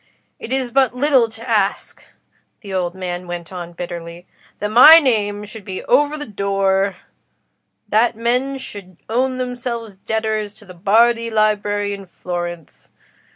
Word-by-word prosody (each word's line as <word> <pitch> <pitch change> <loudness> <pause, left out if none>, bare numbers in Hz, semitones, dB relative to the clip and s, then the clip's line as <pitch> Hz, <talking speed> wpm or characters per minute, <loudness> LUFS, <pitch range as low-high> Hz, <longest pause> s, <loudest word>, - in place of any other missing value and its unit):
It 235 - -8
is 260 -2 -1
but 260 -1 +2
little 260 -3 +3
to 225 +2 -10
ask," 210 -4 -1 0.6
the 200 -4 -8
old 180 -1 -1
man 180 -1 -5
went 175 0 -6
on, 175 -1 -7
bitterly, 170 0 -7 0.3
"that 210 0 -3
my 295 +8 +10
name 210 -8 +1
should 210 0 -11
be 190 -2 -6
over 290 +4 +2
the 295 - -6
door—that 200 +2 -2
men 250 +4 0
should 195 -8 -10
own 255 +3 0
themselves 245 -4 -5
debtors 215 0 -2
to 215 - -16
the 185 - -12
Bardi 230 +6 +3
Library 205 -2 0
in 195 -1 -9
Florence. 175 -2 -6
210 Hz, 140 wpm, -19 LUFS, 190-240 Hz, 0.6 s, my